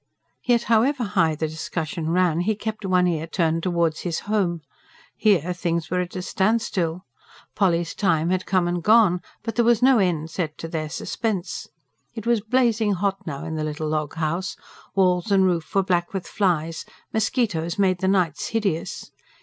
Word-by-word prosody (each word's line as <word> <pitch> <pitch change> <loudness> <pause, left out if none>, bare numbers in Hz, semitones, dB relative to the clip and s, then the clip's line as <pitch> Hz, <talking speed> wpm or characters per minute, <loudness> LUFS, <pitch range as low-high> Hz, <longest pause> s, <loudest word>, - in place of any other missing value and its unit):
Yet 240 -2 +2
however 240 +4 +2
high 165 -6 +2
the 160 +1 -2
discussion 160 +1 -4
ran, 175 -1 +2
he 210 +5 +1
kept 215 -1 -4
one 180 -1 +3
ear 165 -2 -1
turned 165 -1 0
towards 170 -3 0
his 170 -3 -3
home. 190 -6 0 0.5
Here, 180 -5 +2
things 170 -2 -2
were 180 - +1
at 180 +1 -6
a 185 - -3
standstill. 190 -4 0 0.5
Polly's 175 -4 +1
time 170 -4 +1
had 185 0 -1
come 185 -2 +2
and 175 0 -1
gone 205 -3 +5 0.2
but 225 0 -3
there 240 - +3
was 235 0 +3
no 260 -2 +6
end 165 -4 0
set 155 -3 -3
to 165 - -6
their 155 -2 -3
suspense. 200 +1 -3 0.5
It 225 - -6
was 235 -2 +2
blazing 225 -2 +2
hot 195 +1 -2
now 140 -3 -5
in 160 - -4
the 155 - -2
little 155 +1 -3
log 155 -1 -2
house; 165 +4 -2 0.4
walls 180 0 +2
and 190 -1 +5
roof 175 -2 -1
were 195 - +4
black 175 0 0
with 190 - -3
flies; 165 -5 0 0.3
mosquitoes 205 -7 0
made 185 -3 +2
the 190 - 0
nights 180 -5 +1
hideous. 205 -8 -2
180 Hz, 175 wpm, -23 LUFS, 165-205 Hz, 0.5 s, no